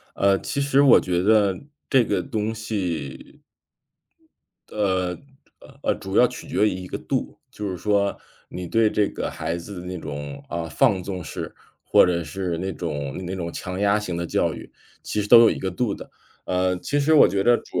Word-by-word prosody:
呃， 100 0 +3
其 140 - -3
实 140 0 +3
我 140 -3 +7
觉 90 -1 -1
得 100 -2 +3 0.3
这 130 -3 +5
个 105 - 0
东 110 +1 -2
西 90 -11 -5 1.3
呃， 95 -4 0 0.7
呃， - - +1
主 95 0 -5
要 125 - +7
取 125 0 -9
决 105 - +2
于 - - -2
一 90 0 -6
个 - - -4
度， - - -3
就 105 -1 -5
是 90 - -4
说， 100 +1 +1 0.3
你 90 0 -6
对 110 +5 +3
这 105 -1 +1
个 - - -4
孩 80 +2 -3
子 90 +1 -8
的 90 - -9
那 90 0 -5
种 70 -2 -7
呃， 85 -1 -4
放 100 - +2
纵 90 0 -5
式， 75 - -6 0.3
或 - - +5
者 85 -2 0
是 85 +2 -3
那 95 +2 -3
种 75 -6 -4
那 90 - -4
种 85 -2 -4
强 90 0 -5
压 100 +1 +3
型 90 -5 -4
的 85 - -2
教 - - 0
育， - - -10 0.3
其 105 - -2
实 105 - -3
都 120 +1 +10
有 115 - +7
一 - - -3
个 95 - -2
度 100 +3 -1
的。 - - -11 0.4
呃， 90 0 +1
其 145 +10 -1
实 145 +2 +2
我 150 - +8
觉 100 -1 0
得 120 +3 +5
主 - - -4
95 Hz, 215 characters per minute, -23 LUFS, 90-105 Hz, 1.3 s, 都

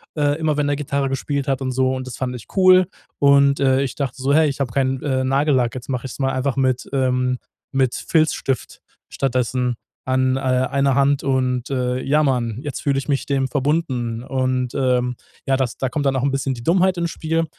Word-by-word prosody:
äh, 145 0 +1
immer 155 -2 +1
wenn 145 0 0
der 145 - +1
Gitarre 140 -1 -1
gespielt 140 +1 -2
hat 135 0 0
und 130 -1 -1
so. 130 0 +1
Und 130 0 -5
das 130 - -6
fand 130 -1 -2
ich 120 - -9
cool. 185 -1 +6 0.3
Und, 140 0 +4
äh, 135 -1 +3
ich 135 -2 -3
dachte 135 -2 -4
so: 135 +2 +2
„Hey, 155 +1 +5
ich 140 -1 -3
habe 130 -4 -1
keinen, 130 +1 0
äh, 130 -3 0
Nagellack, 135 -3 +1
jetzt 130 +1 -8
mache 130 -1 -2
ich's 130 - -7
mal 135 -1 +1
einfach 130 0 -1
mit, 130 -2 0
ähm, 125 -1 +1 0.3
mit 130 -2 +2
Filzstift 155 -5 0 0.3
stattdessen 125 -1 -1 0.3
an, 130 0 +1
äh, - - -2
einer 130 +1 +1
Hand 140 0 +2
und, 130 -2 0
äh, 125 -2 -1
ja 150 +3 +2
man, 120 -5 0
jetzt 145 -3 -5
fühle 140 -1 +1
ich 135 - -3
mich 140 -2 0
dem 135 -2 +1
verbunden." 130 -4 -1
Und, 130 -2 -1
ähm, 125 -2 +1 0.3
ja, 135 - +2
das 130 -3 -2
da 135 - -1
kommt 145 +3 -2
dann 135 - +1
auch 130 - 0
'n 140 - +2
bisschen 135 -1 -1
die 115 - -9
Dummheit 185 +4 +3
ins 170 -1 -1
Spiel. 165 +1 -1
135 Hz, 215 wpm, -21 LUFS, 130-140 Hz, 0.3 s, cool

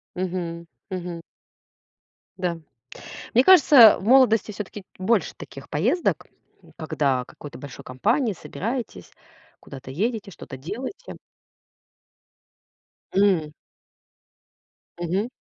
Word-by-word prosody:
Мгм, 175 -2 -4 0.3
мгм. 175 -2 -5 1.2
Да. 180 -2 -2 0.8
Мне 250 +3 +5
кажется, 285 - +8
в - - -10
молодости 230 -2 +4
всё-таки 205 0 -7
больше 190 0 +1
таких 135 - -11
поездок, 245 - 0 0.5
когда 140 -5 -1
какой-то 145 +2 -11
большой 140 -2 -10
компанией 215 - 0
собираетесь, 235 +8 -5 0.5
куда-то 135 -1 -10
едете, 205 - -2
что-то 130 - -10
делаете. 255 - -7 2.0
М. 185 -6 +2 1.4
Мгм. 180 +6 -2
190 Hz, 85 wpm, -24 LUFS, 165-230 Hz, 2.0 s, кажется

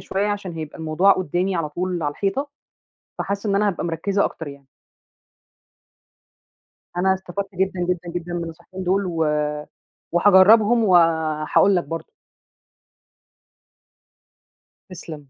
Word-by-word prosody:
شوية 200 +2 -2
عشان 205 -3 -3
هيبقى 155 -2 -7
الموضوع 160 +5 +3
قُدّامي 180 +2 -1
على 165 -3 -2
طول 175 +2 -3
على 145 - 0
الحيطة، 260 - -2 0.7
فحاسّة 200 +1 -3
إن 200 - +1
أنا 210 +1 +2
هابقى 180 -3 -2
مركِّزة 190 +5 0
أكتر 160 - -6
يعني. 140 -1 -11 2.3
أنا 190 +1 +3
استفدت 190 +1 -6
جدًا، 190 0 -1
جدًا، 180 -1 -2
جدًا 175 0 -4
من 175 -1 -2
النصيحتين 170 +3 -9
دول 190 +2 +1
و 165 -3 -1 0.9
وهاجرّبهم 205 +6 +5
وهاقول 165 -1 +3
لك 175 - +1
برضه. 165 0 -7 2.8
تسلم. 155 -5 -10
180 Hz, 120 wpm, -22 LUFS, 165-195 Hz, 2.8 s, وهاجرّبهم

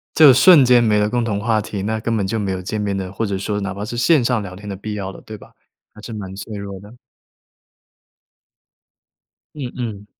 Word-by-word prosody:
就 155 - +8
是 135 - +9
瞬 170 -8 +8
间 120 -1 +5
没 105 -2 +3
了 105 - +1
共 120 +1 0
同 105 -3 -2
话 110 0 +1
题， 100 -2 -5
那 110 +2 -2
根 115 0 -1
本 100 - -1
就 115 - -2
没 100 -2 -2
有 95 -1 -3
见 105 +4 -4
面 100 -1 -2
的 95 -1 -5
或 105 +3 -2
者 100 -2 -2
说 105 +2 -3
哪 100 -1 -3
怕 100 +1 -5
是 120 - -6
线 125 +3 +3
上 120 -2 +1
聊 95 -2 -8
天 105 +2 -11
的 100 - -4
必 105 +2 -6
要 95 -2 -4
了， - - -13
对 110 - -10
吧？ - - -17 0.4
还 105 - -14
是 115 - -8
蛮 100 -3 -7
脆 105 +2 -8
弱 100 -1 -7
的。 105 +4 -14 2.6
嗯 130 -4 -5
嗯。 105 -5 -5
105 Hz, 255 characters per minute, -20 LUFS, 100-115 Hz, 2.6 s, 是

